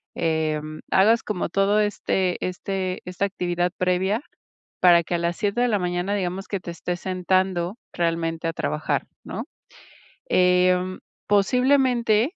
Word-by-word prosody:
em, 155 -1 -1
hagas 220 +5 +4
como 205 -4 -2
todo 195 +4 +2
este 190 -3 0
este 185 0 -3
esta 180 +2 -4
actividad 180 -2 -1
previa, 185 +5 +1 0.6
para 175 -2 +6
que 170 - -5
a 175 - +2
las 170 0 -1
7 210 +3 0
de 245 - +3
la 215 - +2
mañana, 180 +2 -1
digamos 190 0 -3
que 200 - -2
te 170 - -7
estés 175 +1 -4
sentando 185 0 0 0.2
realmente 165 -1 -1
a 165 - -1
trabajar, 155 -2 -1 0.2
¿no?, - - -5 0.8
em, 180 0 +3 0.3
posiblemente, 250 - +3
185 Hz, 135 wpm, -24 LUFS, 175-200 Hz, 0.8 s, para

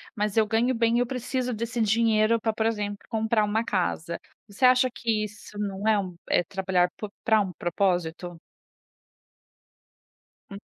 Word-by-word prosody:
mas 210 0 -1
eu 220 - +5
ganho 230 +4 +1
bem 230 0 +2
e - - +3
eu 245 - +1
preciso 250 0 -2
desse 230 +2 -3
dinheiro, 220 +1 +3
pra, 220 0 -1
por 220 +1 0
exemplo, 205 -2 -2
comprar 220 -1 +1
uma 220 +2 0
casa". 170 -4 -1 0.3
Você 205 +4 -8
acha 255 0 +5
que 225 -5 -1
isso 210 0 -12
não 200 0 -3
é 220 - +4
um 185 -3 -5
é 175 - +3
trabalhar 185 -1 +1
po 210 - -6
pra 220 -1 +4
um 195 -2 -3
propósito? 175 -1 -1 2.1
Hum. 200 0 -8
215 Hz, 160 wpm, -26 LUFS, 195-230 Hz, 2.1 s, eu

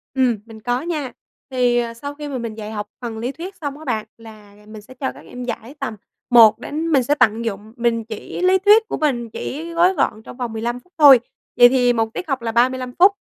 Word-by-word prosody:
Ừm, 250 -4 +2
mình 225 -1 -12
có 245 +3 -1
nha. 305 -6 -3 0.4
Thì, 250 -2 +2
ờ, 235 -1 -2
sau 285 +5 -7
khi 295 0 -7
mà 270 -3 -4
mình 230 -2 -5
dạy 215 -1 -7
học 210 -1 -4
phần 230 -3 -5
lý 240 +4 -3
thuyết 360 +8 -8
xong 285 -4 -5
á 315 - -11
bạn, 225 -6 -2
là 215 -3 -14
mình 215 -1 -10
sẽ 255 - -15
cho 245 - -3
các 140 +3 -14
em 250 0 -8
giải 235 +2 -6
tầm 270 -5 -4 0.3
1 230 -3 +7
đến 315 +3 -4
mình 270 -3 +4
sẽ 285 +4 +1
tận 225 -4 +2
dụng 215 0 -5
mình 235 -1 0
chỉ 220 +9 -7
lý 370 +1 +4
thuyết 425 +3 +5
của - - -2
mình 240 -7 -1
chỉ 320 +9 -6
gói 350 +3 +3
gọn 220 - -1
trong - - -11
vòng 245 -3 -4
15 235 +2 -3
phút 360 - -32
thôi. 280 -5 +9 0.4
Vậy 245 - +9
thì 245 -1 +3
1 225 -1 -1
tiết 360 - -5
học 270 -4 -2
là 225 -1 -2
35 255 +2 +1
phút. 380 +3 +7
245 Hz, 245 wpm, -20 LUFS, 225-285 Hz, 0.4 s, thôi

